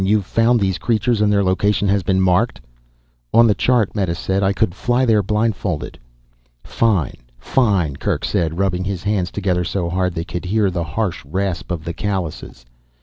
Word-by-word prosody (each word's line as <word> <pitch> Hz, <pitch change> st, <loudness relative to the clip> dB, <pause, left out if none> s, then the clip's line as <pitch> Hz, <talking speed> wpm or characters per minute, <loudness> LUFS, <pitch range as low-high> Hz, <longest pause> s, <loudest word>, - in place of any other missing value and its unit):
"You've 100 Hz, 0 st, +2 dB
found 115 Hz, +4 st, +2 dB
these 95 Hz, -3 st, 0 dB
creatures 115 Hz, -1 st, +1 dB
and 105 Hz, -1 st, +3 dB
their 100 Hz, -1 st, +3 dB
location 100 Hz, +2 st, +1 dB
has 100 Hz, 0 st, +2 dB
been 95 Hz, +1 st, +1 dB
marked." 95 Hz, +6 st, +2 dB, 0.8 s
"On 115 Hz, -, +7 dB
the 110 Hz, -, +4 dB
chart," 120 Hz, -2 st, +1 dB
Meta 95 Hz, -5 st, 0 dB
said, 95 Hz, +3 st, -1 dB
"I 95 Hz, 0 st, +2 dB
could 100 Hz, -2 st, 0 dB
fly 120 Hz, +5 st, +1 dB
there 110 Hz, -3 st, +3 dB
blindfolded." 100 Hz, -, -2 dB, 0.6 s
"Fine, 100 Hz, -, 0 dB, 0.2 s
fine," 95 Hz, -, +1 dB
Kerk -, -, -2 dB
said, 80 Hz, -1 st, -1 dB
rubbing 95 Hz, -1 st, 0 dB
his 95 Hz, -2 st, -3 dB
hands 100 Hz, -3 st, 0 dB
together 90 Hz, -3 st, -1 dB
so 85 Hz, -1 st, -2 dB
hard 90 Hz, -1 st, -1 dB
they 85 Hz, 0 st, -3 dB
could 90 Hz, +1 st, -5 dB
hear 100 Hz, +1 st, +1 dB
the 85 Hz, -1 st, -2 dB
harsh 90 Hz, +4 st, -3 dB
rasp 95 Hz, +4 st, -3 dB
of 85 Hz, -3 st, -3 dB
the 85 Hz, -, -4 dB
callouses. 90 Hz, -10 st, -4 dB
95 Hz, 180 wpm, -19 LUFS, 90-105 Hz, 0.8 s, On